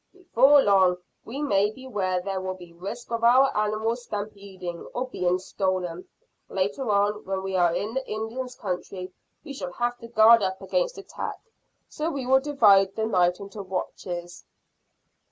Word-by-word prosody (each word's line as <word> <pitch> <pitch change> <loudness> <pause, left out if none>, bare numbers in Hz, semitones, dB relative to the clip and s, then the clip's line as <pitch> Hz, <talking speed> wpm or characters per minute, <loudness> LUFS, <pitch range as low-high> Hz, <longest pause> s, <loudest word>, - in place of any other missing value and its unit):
"Before 290 -6 +5
long 190 -3 +4 0.3
we 270 +6 -5
may 205 -7 +3
be 260 +5 -12
where 185 -7 -1
there 195 -1 -3
will 185 0 -3
be 175 -2 -13
risk 200 +8 -7
of 230 0 -2
our 255 +3 +5
animals 215 +3 0
stampeding, 200 -5 -6 0.2
or 250 - -1
being 180 -7 0
stolen. 185 -2 -3 0.4
Later 200 +7 -2
on, 205 +1 +1
when 190 0 -3
we 190 0 -3
are 175 -2 +4
in 215 +2 -3
the 265 0 -3
Indians' 230 +4 -4
country, 185 -1 -5 0.3
we 290 -2 -7
shall 180 -10 -6
have 240 0 -2
to 230 - -9
guard 230 0 +6 0.2
against - - -1
attack, 395 -1 -6 0.5
so 310 +2 -3
we 275 -5 -4
will 265 +1 +5
divide 210 -9 +4
the 220 - -1
night 180 -4 +2
into 200 +1 -8
watches." 175 -2 -5
210 Hz, 160 wpm, -26 LUFS, 185-245 Hz, 0.5 s, guard